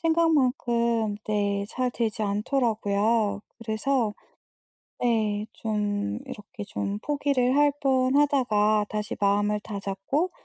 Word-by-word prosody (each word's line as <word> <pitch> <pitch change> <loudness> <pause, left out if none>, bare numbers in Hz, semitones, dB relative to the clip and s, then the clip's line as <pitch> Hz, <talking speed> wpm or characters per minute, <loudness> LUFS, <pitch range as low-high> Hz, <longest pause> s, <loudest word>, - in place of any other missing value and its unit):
생각만큼 245 -9 +2
네 200 -1 0
잘 255 0 -1
되지 225 -3 -2
않더라고요. 210 -1 +1 0.2
그래서 230 0 0 0.9
네 215 -3 +1
좀 205 - -2
이렇게 210 +1 -8
좀 200 +1 -3
포기를 280 -1 +1
할 290 -1 +4
뻔하다가 255 -6 +3
다시 210 0 -4
마음을 205 +1 +2
다잡고 205 - -2
220 Hz, 220 characters per minute, -26 LUFS, 205-255 Hz, 0.9 s, 할